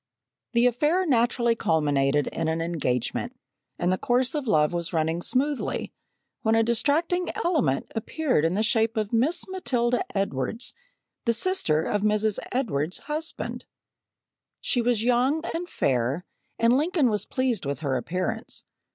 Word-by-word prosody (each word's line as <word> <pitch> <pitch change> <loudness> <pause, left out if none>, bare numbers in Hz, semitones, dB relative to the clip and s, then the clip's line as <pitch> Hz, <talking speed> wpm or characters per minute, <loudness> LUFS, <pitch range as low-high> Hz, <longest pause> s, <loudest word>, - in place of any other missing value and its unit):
The 235 +1 +4
affair 300 +10 +2
naturally 240 -3 +2
culminated 145 - +1
in 165 - -3
an 160 +1 0
engagement, 165 - -2 0.4
and 180 +1 +1
the 185 - -2
course 250 +1 +1
of 295 -4 -3
love 155 -5 +3
was 170 0 -3
running 160 +1 0
smoothly, 275 +7 -1 0.5
when 220 0 +2
a 225 - +4
distracting 310 +10 +1
element 300 - 0
appeared 250 - 0
in 165 +3 +1
the 215 - +1
shape 225 -1 +1
of 215 +1 -1
Miss 265 +9 +2
Matilda 245 -10 0
Edwards, 195 - -1 0.5
the 235 - +3
sister 230 - +2
of 205 +3 -1
Mrs. 210 0 +2
Edwards's 180 - -1
husband. 310 +2 -4 0.9
She 245 - 0
was 235 -2 +1
young 250 +6 +2
and 350 +2 -4
fair, 130 +7 0 0.3
and 230 +2 +4
Lincoln 300 - +2
was 210 - 0
pleased 250 - -1
with 140 +2 -3
her 140 -4 0
appearance. 180 +9 -2
230 Hz, 145 wpm, -26 LUFS, 165-260 Hz, 0.9 s, The